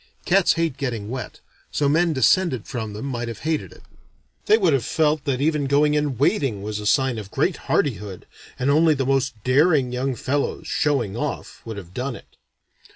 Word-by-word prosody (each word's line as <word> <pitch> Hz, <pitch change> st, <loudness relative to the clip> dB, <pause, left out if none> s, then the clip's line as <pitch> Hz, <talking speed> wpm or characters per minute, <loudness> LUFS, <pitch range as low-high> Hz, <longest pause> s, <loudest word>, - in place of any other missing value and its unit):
Cats 195 Hz, 0 st, +4 dB
hate 165 Hz, -5 st, -1 dB
getting 115 Hz, -6 st, -3 dB
wet, 125 Hz, -3 st, -6 dB, 0.3 s
so 145 Hz, -, +1 dB
men 165 Hz, +4 st, +3 dB
descended 150 Hz, -, +2 dB
from 110 Hz, -4 st, -5 dB
them 105 Hz, +5 st, -6 dB
might 120 Hz, -3 st, -3 dB
have 115 Hz, -2 st, -7 dB
hated 155 Hz, -1 st, -2 dB
it. -, -, -16 dB, 0.6 s
They 215 Hz, -, +6 dB
would 180 Hz, -8 st, +3 dB
have 135 Hz, -4 st, +1 dB
felt 155 Hz, +2 st, +1 dB
that 135 Hz, -2 st, -1 dB
even 150 Hz, -1 st, +1 dB
going 145 Hz, +2 st, +3 dB
in 150 Hz, -4 st, 0 dB
wading 135 Hz, -, +1 dB
was 105 Hz, 0 st, -2 dB
sign 130 Hz, -4 st, +2 dB
of 100 Hz, -2 st, -8 dB
great -, -, 0 dB
hardihood, 105 Hz, -8 st, -1 dB, 0.3 s
and 130 Hz, +3 st, +1 dB
only 155 Hz, +1 st, +4 dB
the 135 Hz, -1 st, -1 dB
most 135 Hz, -2 st, +1 dB
daring 135 Hz, 0 st, +3 dB
young 130 Hz, +1 st, -1 dB
fellows, 140 Hz, +4 st, -2 dB
showing 135 Hz, -9 st, 0 dB
off, 145 Hz, +4 st, -5 dB
would 110 Hz, -2 st, -6 dB
have 90 Hz, -3 st, -10 dB
done 125 Hz, +3 st, -3 dB
it. -, -, -15 dB
135 Hz, 185 wpm, -23 LUFS, 120-150 Hz, 0.6 s, They